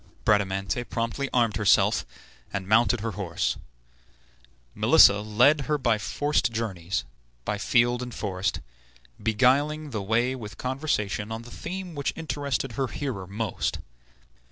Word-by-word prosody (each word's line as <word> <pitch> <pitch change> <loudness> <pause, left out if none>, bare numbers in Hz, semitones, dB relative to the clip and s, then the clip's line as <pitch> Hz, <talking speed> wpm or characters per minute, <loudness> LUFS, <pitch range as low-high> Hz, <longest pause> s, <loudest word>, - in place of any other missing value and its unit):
Bradamante 100 +2 +1
promptly 115 +5 -2
armed 115 -4 +2
herself, 105 -3 +3 0.4
and 95 -2 -4
mounted 115 +1 +3
her 115 +1 -2
horse. 95 -5 -2 1.2
Melissa 100 +1 +6
led 120 +8 +4
her 150 - +2
by 115 -5 +1
forced 145 +2 0
journeys, 95 -6 -2 0.4
by 105 - -2
field 120 +2 +2
and 125 0 -5
forest, 100 -4 -2 0.6
beguiling 140 +7 +2
the 110 -4 -3
way 120 +6 +1
with 105 -5 -8
conversation 120 -6 -2
on 110 +1 -5
the 120 - -12
theme 180 +4 -6
which 140 -2 -2
interested 145 -5 -2
her 130 +4 -1
hearer 120 -10 -4
most. 105 0 -2
115 Hz, 130 wpm, -26 LUFS, 105-135 Hz, 1.2 s, Melissa